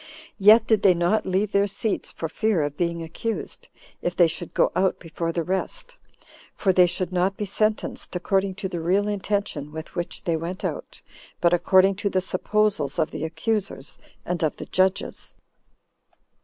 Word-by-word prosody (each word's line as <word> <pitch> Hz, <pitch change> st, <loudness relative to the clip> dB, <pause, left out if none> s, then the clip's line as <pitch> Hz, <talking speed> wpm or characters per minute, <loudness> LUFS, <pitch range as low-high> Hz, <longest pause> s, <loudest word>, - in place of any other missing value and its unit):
Yet 215 Hz, +3 st, +7 dB
did 220 Hz, -3 st, +3 dB
they 190 Hz, -3 st, +5 dB
not 175 Hz, +6 st, +1 dB
leave 190 Hz, +2 st, 0 dB
their 200 Hz, 0 st, +3 dB
seats, 205 Hz, +2 st, -2 dB
for 165 Hz, -, -4 dB
fear 195 Hz, 0 st, +1 dB
of 145 Hz, 0 st, -3 dB
being 170 Hz, 0 st, -1 dB
accused, 220 Hz, +8 st, -5 dB, 0.3 s
if 175 Hz, 0 st, -2 dB
they 175 Hz, -, +6 dB
should 165 Hz, +1 st, -4 dB
go -, -, +3 dB
out 190 Hz, 0 st, +2 dB
before 165 Hz, 0 st, -4 dB
the 170 Hz, 0 st, -1 dB
rest; 190 Hz, -, -3 dB, 0.6 s
for 190 Hz, -2 st, +2 dB
they 180 Hz, -1 st, +6 dB
should 180 Hz, +1 st, -2 dB
not 185 Hz, +2 st, +1 dB
be 210 Hz, -, -2 dB
sentenced 215 Hz, -1 st, -1 dB
according 190 Hz, +1 st, 0 dB
to 195 Hz, -1 st, -3 dB
the 180 Hz, -2 st, -4 dB
real 190 Hz, +5 st, +1 dB
intention 200 Hz, -7 st, -2 dB
with 160 Hz, +1 st, -8 dB
which 175 Hz, -1 st, -5 dB
they 170 Hz, -, 0 dB
went 170 Hz, +4 st, -4 dB
out, -, -, -5 dB, 0.4 s
but 170 Hz, 0 st, +3 dB
according 190 Hz, +2 st, +5 dB
to 200 Hz, 0 st, -1 dB
the 190 Hz, -, +1 dB
supposals 185 Hz, -5 st, 0 dB
of 160 Hz, -2 st, +1 dB
the -, -, -5 dB
accusers 185 Hz, 0 st, -2 dB, 0.3 s
and 180 Hz, -1 st, -2 dB
of 155 Hz, -, +1 dB
the -, -, -7 dB
judges. 190 Hz, +1 st, 0 dB
185 Hz, 175 wpm, -24 LUFS, 170-200 Hz, 0.6 s, Yet